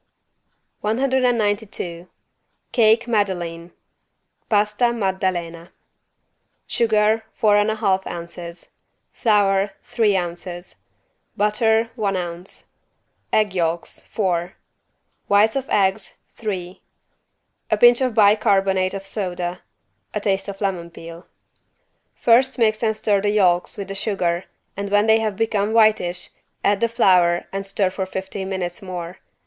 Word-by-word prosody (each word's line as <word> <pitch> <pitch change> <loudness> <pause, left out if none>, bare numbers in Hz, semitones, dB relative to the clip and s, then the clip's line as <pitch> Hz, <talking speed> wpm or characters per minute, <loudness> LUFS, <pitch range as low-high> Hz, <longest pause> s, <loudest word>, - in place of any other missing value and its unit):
192 220 -7 -1 0.6
CAKE 230 0 +3
MADELEINE 175 -6 -2 0.8
(Pasta 210 +3 +2
Maddalena) 185 -5 -2 1.0
Sugar, 220 -1 +2
four 215 -3 +3
and 205 +1 +3
a 220 - 0
half 195 -3 0
ounces, 170 0 -8 0.4
Flour, 200 -3 +2
three 210 -4 +1
ounces, 175 0 -6 0.6
Butter, 220 +2 +2
one 205 -5 -1
ounce, 175 +1 -6 0.7
Egg 210 -3 +2
yolks, 170 -2 -2
four, 180 -3 -2 0.7
Whites 210 +3 +4
of 270 -1 -3
eggs, 195 0 0 0.2
three, 185 -5 -5 0.9
A - - +2
pinch 240 +1 +6
of 255 -4 0
bi 210 -2 +6
carbonate 195 -3 +1
of 195 0 -6
soda, 180 -3 -4 0.5
A - - +1
taste 195 -1 -1
of 200 0 -7
lemon 185 -4 -2
peel. 170 +1 -11 0.9
First 255 +3 +3
mix 220 -2 +2
and 220 -2 0
stir 205 -3 +1
the 205 - +1
yolks 185 -4 +2
with 200 -1 -5
the 195 - -5
sugar 185 -4 -1 0.3
and 200 0 -4
when 205 +1 +3
they 220 0 +5
have 215 -2 -2
become 215 -1 0
whitish, 215 -6 +2 0.3
add 200 -1 +2
the 230 - +3
flour 180 -7 +3
and 195 0 -4
stir 195 -1 0
for 190 0 -4
fifteen 190 0 -5
minutes 180 -2 -4
more. 180 -1 -7
200 Hz, 120 wpm, -21 LUFS, 180-220 Hz, 1.0 s, pinch